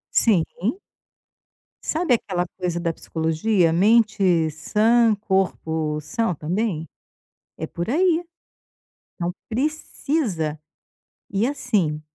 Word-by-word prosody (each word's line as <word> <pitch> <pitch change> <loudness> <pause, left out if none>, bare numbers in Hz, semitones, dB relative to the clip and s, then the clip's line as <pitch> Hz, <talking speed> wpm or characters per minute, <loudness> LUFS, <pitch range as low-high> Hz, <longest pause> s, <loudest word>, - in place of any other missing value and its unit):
Sim. 195 -9 +4 1.4
Sabe 320 -5 +2
aquela 180 -5 -2
coisa 180 -2 -2
da 170 -1 -1
psicologia: 165 +3 +1
"Mente 195 -4 +3
sã, 220 +8 +3
corpo 160 -6 0
são 225 +5 -1
também". 170 +1 -2 0.7
É - - -4
por 170 +4 -4
aí. 340 +4 +3 0.9
Então 175 -1 -2 0.2
precisa. 245 - -1 0.7
E 200 +3 +1
assim, 185 - 0
190 Hz, 90 wpm, -23 LUFS, 165-230 Hz, 1.4 s, Sim